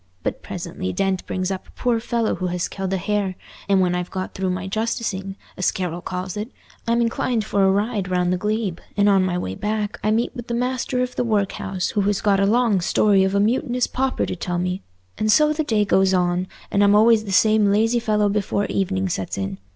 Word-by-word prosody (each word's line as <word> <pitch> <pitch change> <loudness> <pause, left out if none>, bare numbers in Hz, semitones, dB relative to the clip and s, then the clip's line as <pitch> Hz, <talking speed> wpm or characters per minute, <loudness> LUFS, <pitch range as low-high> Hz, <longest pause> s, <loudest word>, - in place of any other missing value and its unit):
But - - -3
presently 95 - -5
Dent 190 - 0
brings 185 0 -2
up 190 - -5
a - - -17
poor 240 -2 +1
fellow 230 -1 0
who 185 - -2
has 180 -1 -2
killed 190 -1 -4
a 195 - +1
hare, 200 0 -1 0.3
and 195 -1 +4
when 180 -1 +2
I've 180 0 -2
got 185 0 -5
through 190 0 -2
my 185 +1 -3
'justicing,' 195 -2 -2 0.2
as 185 - +2
Carroll 175 -2 -3
calls 180 0 -4
it, 210 +3 -4 0.4
I'm 235 +1 +2
inclined 230 -1 0
for 200 -2 +1
a 190 - +5
ride 205 -1 -1
round 180 0 +1
the - - 0
glebe, 210 -2 -2 0.2
and 205 0 +4
on 195 -2 +4
my 180 -1 0
way 95 - -3
back 210 - -3
I 215 - +2
meet 225 +4 0
with 240 -2 -7
the 235 - -2
master 250 +1 -1
of 250 0 -5
the - - 0
workhouse, 200 -4 -1
who 205 - +1
has 200 0 +1
got 200 -2 +2
a 195 - +3
long 225 -3 +3
story 195 +2 +3
of 190 +1 0
a - - +3
mutinous 245 +3 +1
pauper 265 0 -1
to - - -4
tell 175 0 -3
me; 180 +1 -2 0.4
and 215 0 +2
so 305 +5 +5
the 315 +1 -1
day 215 -7 +1
goes 190 -1 +3
on, 180 0 +1 0.2
and 200 - +3
I'm 200 0 +5
always 220 0 +5
the 200 - -5
same 215 +1 +4
lazy 225 +4 +2
fellow 210 -3 +1
before 205 0 0
evening 190 0 -1
sets 95 - -3
in. 95 0 -4
200 Hz, 230 wpm, -22 LUFS, 185-220 Hz, 0.4 s, a